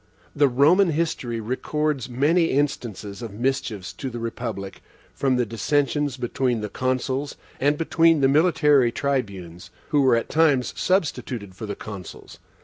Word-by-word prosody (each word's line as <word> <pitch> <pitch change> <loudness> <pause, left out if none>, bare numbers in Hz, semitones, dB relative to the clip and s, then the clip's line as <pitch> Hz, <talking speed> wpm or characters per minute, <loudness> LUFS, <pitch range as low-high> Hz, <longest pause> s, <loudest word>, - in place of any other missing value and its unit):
The 145 0 +4
Roman 155 +9 +4
history 150 -7 -2
records 130 +4 -2
many 150 +8 +2
instances 120 - -2
of 115 -4 -7
mischiefs 115 -5 -2
to 135 - -5
the 120 - -7
republic 115 -4 -5 0.3
from 135 -2 +1
the 125 -1 +1
dissensions 140 +6 0
between 125 -1 -1
the 105 - -4
Consuls, 130 +3 -2 0.2
and 145 +2 +2
between 165 -1 +3
the 135 - +5
military 150 -4 +4
Tribunes, 100 -12 -3 0.2
who 150 -2 +3
were 130 -3 +4
at 115 - -1
times 145 -6 +2
substituted 130 - -1
for 110 +4 -7
the 100 - -4
Consuls. 100 -5 -10
130 Hz, 140 wpm, -23 LUFS, 115-145 Hz, 0.3 s, the